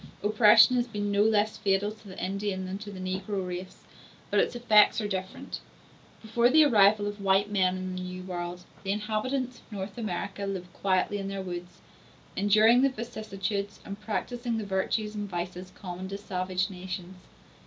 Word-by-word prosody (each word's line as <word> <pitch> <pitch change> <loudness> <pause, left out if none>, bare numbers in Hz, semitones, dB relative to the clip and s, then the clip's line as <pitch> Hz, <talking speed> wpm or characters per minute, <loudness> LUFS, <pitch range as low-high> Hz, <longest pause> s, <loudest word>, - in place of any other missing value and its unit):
Oppression 215 +3 +6
has 240 0 +1
been 205 -3 -2
no 200 0 +3
less 215 0 +3
fatal 195 +1 +1
to 215 -1 -14
the 185 - -10
Indian 190 +1 -2
than 190 +1 -5
to 210 -1 -8
the 190 - -8
negro 190 +1 -3
race, 180 +1 -7 0.5
but - - +3
its - - +1
effects 220 -2 +5
are 210 - -1
different. 190 -2 -5 0.6
Before 235 +2 +3
the 310 +4 +7
arrival 210 -6 +5
of 205 0 -4
white 195 +1 +3
men 185 -2 +2
in 185 0 -4
the 185 - -4
New 185 0 -6
World, 175 -1 -5 0.2
the 195 - -5
inhabitants 235 +5 -2
of - - -24
North 195 +2 -6
America 200 -1 -3
lived 185 -2 -5
quietly 195 +1 +1
in 195 - -4
their 195 -1 -4
woods, 175 -1 -7 0.5
enduring 215 +5 +5
the 275 - +5
vicissitudes 210 -4 -4
and 200 +1 -7
practising 235 +2 -2
the 215 - -3
virtues 200 +2 -1
and 205 -1 -4
vices 180 +1 -5
common 185 0 -6
to 195 - -4
savage 185 0 -2
nations. 185 0 -6
200 Hz, 175 wpm, -28 LUFS, 185-215 Hz, 0.6 s, the